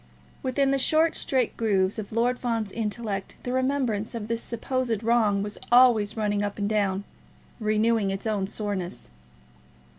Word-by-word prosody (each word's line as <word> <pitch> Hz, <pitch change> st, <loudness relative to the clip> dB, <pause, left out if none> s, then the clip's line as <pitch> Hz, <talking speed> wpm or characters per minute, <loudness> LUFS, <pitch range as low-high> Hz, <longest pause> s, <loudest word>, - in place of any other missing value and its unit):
Within 270 Hz, +1 st, +1 dB
the 275 Hz, -, +2 dB
short 315 Hz, +4 st, +3 dB
straight 255 Hz, -4 st, 0 dB
grooves 200 Hz, -2 st, +1 dB
of 205 Hz, -, -6 dB
Lord 240 Hz, +3 st, +1 dB
Fawn's 230 Hz, -4 st, -2 dB
intellect 210 Hz, -2 st, -3 dB
the 250 Hz, -, -3 dB
remembrance 255 Hz, -5 st, 0 dB
of 215 Hz, -2 st, -4 dB
this 230 Hz, 0 st, 0 dB
supposed 235 Hz, -2 st, -2 dB
wrong 220 Hz, -4 st, +2 dB
was 210 Hz, 0 st, -6 dB
always 240 Hz, -4 st, +5 dB
running 205 Hz, -1 st, 0 dB
up 205 Hz, -1 st, -3 dB
and 205 Hz, -1 st, -1 dB
down, 200 Hz, -2 st, 0 dB, 0.6 s
renewing 215 Hz, -1 st, +2 dB
its 195 Hz, +2 st, -4 dB
own 205 Hz, -3 st, 0 dB
soreness. 190 Hz, -, -4 dB
220 Hz, 150 wpm, -26 LUFS, 205-245 Hz, 0.6 s, always